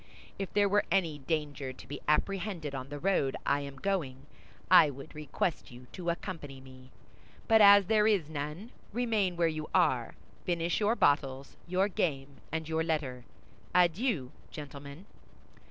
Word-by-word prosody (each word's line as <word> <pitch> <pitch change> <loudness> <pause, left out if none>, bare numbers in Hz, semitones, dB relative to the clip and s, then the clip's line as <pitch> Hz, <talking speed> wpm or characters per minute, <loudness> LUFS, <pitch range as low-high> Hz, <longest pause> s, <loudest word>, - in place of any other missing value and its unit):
If 195 - -4
there 205 -1 +4
were 205 +1 +3
any 170 -5 +1
danger 145 -2 -3
to - - -14
be 145 - -7
apprehended 170 -1 0
on 130 0 -6
the 145 - -6
road 145 -5 +1
I 140 - +2
am 140 -1 -7
going, 140 -6 -3 0.5
I 170 -5 +8
would 140 +2 -10
request 150 +2 -3
you 125 +1 -13
to 175 -2 -4
accompany 165 -6 -5
me; 130 -1 -15 0.6
but 220 -1 +6
as 200 -1 +8
there 215 +2 +3
is 200 -8 +2
none, 155 - -6 0.2
remain 220 -6 0
where 170 -1 +2
you 155 -1 -4
are, - - +2 0.3
finish 170 -1 0
your 215 +2 +2
bottles, 140 - +1
your 185 +3 +2
game, 140 -8 -2
and 160 0 -3
your 160 0 0
letter. 140 -7 -2 0.5
Adieu, 180 - +2 0.2
gentlemen!" 145 +3 -9
160 Hz, 155 wpm, -30 LUFS, 140-190 Hz, 0.6 s, I